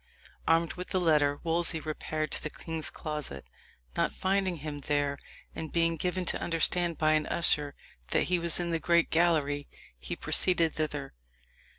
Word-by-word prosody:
Armed 165 0 +3
with 180 0 -6
the 185 - 0
letter, 150 -4 +3
Wolsey 165 0 +1
repaired 155 0 -3
to - - -1
the 150 - -4
king's 160 0 -2
closet. 150 - -5 0.5
Not - - 0
finding 190 -1 +1
him 150 -1 -6
there, 145 -1 0 0.3
and 160 -1 -6
being 165 0 +2
given 180 +3 -2
to - - -1
understand 170 0 0
by 155 0 +3
an 155 0 +2
usher 150 -4 +3 0.3
that - - +3
he 180 -1 +1
was 170 0 0
in 175 -1 -1
the 165 - 0
great 170 +1 +2
gallery, 155 -4 +2 0.3
he - - -5
proceeded 170 -3 +2
thither. 150 -3 -3
160 Hz, 165 wpm, -30 LUFS, 150-170 Hz, 0.5 s, Armed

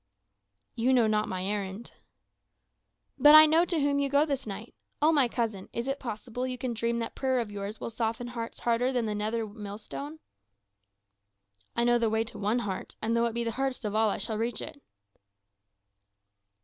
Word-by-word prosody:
"You 245 +3 +2
know 245 -3 +5
not 215 0 +1
my 185 0 -3
errand." 200 +2 -4 1.3
"But 295 +1 +9
I 310 0 +11
know 320 +3 +4
to 340 -3 0
whom 280 0 +2
you 280 -1 0
go 285 +2 +4
this 275 -5 -3
night. 210 +3 -7 0.3
Oh, 305 +2 +4
my 285 -5 +4
cousin, 225 -5 -3
is 235 +2 -3
it 275 +1 -2
possible 245 +1 -4
you 255 -1 -4
can 250 -1 -3
dream 230 +1 -1
that 230 - -3
prayer 260 -1 0
of 225 -3 -3
yours 205 +1 -5
will - - -5
soften 230 +2 -2
hearts 230 -2 -6
harder 240 +2 +1
than 245 -3 0
the 215 - -1
nether 215 +2 -1
millstone?" 210 +8 -7 1.6
"I 235 - +2
know 240 0 +4
the 230 -1 +2
way 220 +1 +1
to 225 - -9
one 210 +4 +1
heart; 190 -2 -5
and 225 +1 0
though 235 0 +3
it 230 - -1
be 235 - 0
the 230 - -1
hardest 265 0 -2
of 205 - -2
all, 220 0 +3
I - - -1
shall 220 -2 -2
reach 230 0 -1
it." 285 - -8
235 Hz, 195 wpm, -29 LUFS, 215-260 Hz, 1.6 s, I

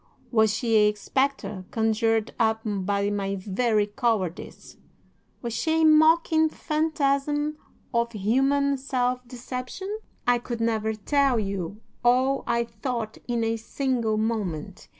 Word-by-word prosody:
Was 220 -3 +4
she 225 +1 +1
a 210 0 +4
spectre 215 -4 -1
conjured 225 0 +1
up 220 -1 +2
by 200 0 0
my 195 -1 -1
very 210 +3 +1
cowardice? 205 -5 -3 0.7
Was 235 -1 -3
she 320 +5 +1
a - - +6
mocking 315 +1 +5
phantasm 300 -1 0 0.4
of 235 0 +1
human 270 +7 +2
self 250 -1 -1
deception? 255 - -6 0.3
"'I 245 0 +3
could 235 -1 -5
never 220 -1 0
tell 275 +4 +2
you 200 0 -4 0.2
all 255 +3 +3
I 235 0 +2
thought 230 -1 -4
in 240 -2 0
a 225 0 0
single 230 -2 -1
moment. 200 -5 -3
235 Hz, 125 wpm, -26 LUFS, 215-275 Hz, 0.7 s, a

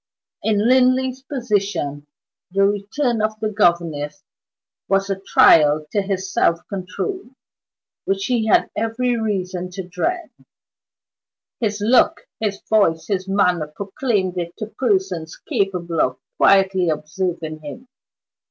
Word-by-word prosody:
In 215 0 +1
Linley's 255 0 +3
position, 205 - -2 0.4
the 195 +2 +2
return 215 +4 0
of 215 0 -1
the 215 0 -1
governess 170 -5 0 0.6
was 195 0 +1
a 195 - -2
trial 155 -5 +5
to 205 - +1
his 195 -1 -3
self 170 -7 +1
control 245 - -5 0.7
which 195 0 -1
he 235 -3 0
had 215 - +3
every 230 +3 0
reason 185 -5 -2
to 180 0 -7
dread: 315 - -2 1.3
his 210 -3 -1
look, 235 +5 +3 0.2
his 210 -3 -2
voice, 195 -7 +2
his 190 -2 -1
manner 180 -5 +1
proclaimed 190 - -2
it 170 0 -5
to 215 - -4
persons 190 -8 -1
capable 185 - -1
of 130 0 0 0.2
quietly 190 -2 +4
observing 160 0 -3
him. 155 - -10
195 Hz, 120 wpm, -21 LUFS, 175-220 Hz, 1.3 s, trial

